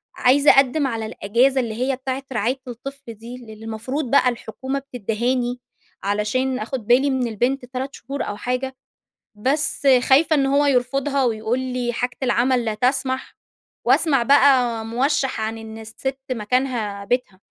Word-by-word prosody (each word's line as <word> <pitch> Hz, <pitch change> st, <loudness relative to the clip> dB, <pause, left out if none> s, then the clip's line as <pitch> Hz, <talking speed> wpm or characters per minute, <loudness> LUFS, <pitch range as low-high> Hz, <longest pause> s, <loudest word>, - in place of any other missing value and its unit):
عايزة 280 Hz, +3 st, +5 dB
أقدّم 275 Hz, +2 st, +3 dB
على 225 Hz, -3 st, -3 dB
الأجازة 245 Hz, +6 st, +1 dB
اللي 230 Hz, -3 st, -4 dB
هي 255 Hz, +3 st, 0 dB
بتاعة 265 Hz, +1 st, -4 dB
رعاية 245 Hz, +4 st, -1 dB
الطفل 260 Hz, +1 st, -8 dB
دي 230 Hz, +3 st, -10 dB
للي 235 Hz, -3 st, -11 dB
المفروض 245 Hz, +5 st, -4 dB
بقى 275 Hz, -2 st, +5 dB
الحكومة 255 Hz, +3 st, -4 dB
بتدّهاني 245 Hz, 0 st, -2 dB, 0.4 s
علشان 215 Hz, +6 st, 0 dB
آخُد 225 Hz, 0 st, -5 dB
بالي 260 Hz, +4 st, +4 dB
من 260 Hz, -2 st, 0 dB
البنت 245 Hz, +4 st, -1 dB
3 260 Hz, +2 st, -5 dB
شهور 275 Hz, +3 st, -5 dB
أو 205 Hz, -, -5 dB
حاجة. 250 Hz, +3 st, -3 dB, 0.6 s
بس 280 Hz, +6 st, 0 dB, 0.2 s
خايفة 310 Hz, +4 st, +5 dB
إن 275 Hz, -2 st, +2 dB
هو 280 Hz, +2 st, +3 dB
يرفضها 275 Hz, +1 st, +1 dB
ويقول 225 Hz, 0 st, 0 dB
لي 250 Hz, -2 st, -2 dB
حاجة 245 Hz, +1 st, -2 dB
العمل 250 Hz, 0 st, +2 dB
لا 220 Hz, -2 st, -1 dB
تسمح. 260 Hz, +3 st, -1 dB, 0.5 s
واسمع 275 Hz, -6 st, +4 dB
بقى 250 Hz, -3 st, +4 dB
موشّح 265 Hz, +3 st, 0 dB
عن 220 Hz, +1 st, -3 dB
إن 220 Hz, 0 st, -9 dB
السِت 225 Hz, +5 st, -5 dB
مكانها 225 Hz, -3 st, -1 dB
بيتها. 200 Hz, -4 st, -2 dB
250 Hz, 145 wpm, -22 LUFS, 230-270 Hz, 0.6 s, عايزة